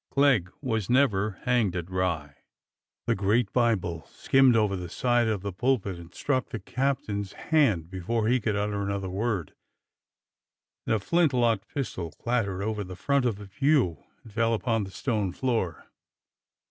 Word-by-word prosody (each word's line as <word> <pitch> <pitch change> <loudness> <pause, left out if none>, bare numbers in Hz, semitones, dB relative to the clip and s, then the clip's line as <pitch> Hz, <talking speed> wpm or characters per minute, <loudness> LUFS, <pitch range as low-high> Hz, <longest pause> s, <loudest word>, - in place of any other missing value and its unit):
" - - -65
Clegg 135 -10 +4
was 110 -7 -1
never 110 -6 +2
hanged 120 -7 +2
at 85 -2 -3
Rye! 85 -6 -1 0.4
" - - -65
The - - +2
great 105 +3 +1
Bible 95 -9 0
skimmed 135 -2 +4
over 105 -3 +2
the 90 -2 -5
side 120 +4 +2
of 105 -4 -1
the 100 -2 -3
pulpit 100 -4 0
and 85 0 -12
struck 130 -3 -1
the 120 - -4
captain's 105 -3 -2
hand 110 - +1
before 105 +5 -1
he 125 +2 +3
could 105 -2 -1
utter 105 0 -1
an 100 - -2
other 100 -2 -3
word, 100 -4 -2 1.3
and - - +3
a - - 0
flint 165 - +2
locked 115 -5 +2
pistol 110 - -3
clattered 100 -2 -1
over 105 -1 -2
the 90 -1 -8
front 140 +7 +1
of 120 -4 +1
the 105 +1 -10
pew 105 - +1 0.2
and 110 - -14
fell 115 +1 +2
upon 115 -2 0
the - - -9
stone 105 -1 -1
floor. 115 -10 -1
105 Hz, 170 wpm, -27 LUFS, 95-125 Hz, 1.3 s, Clegg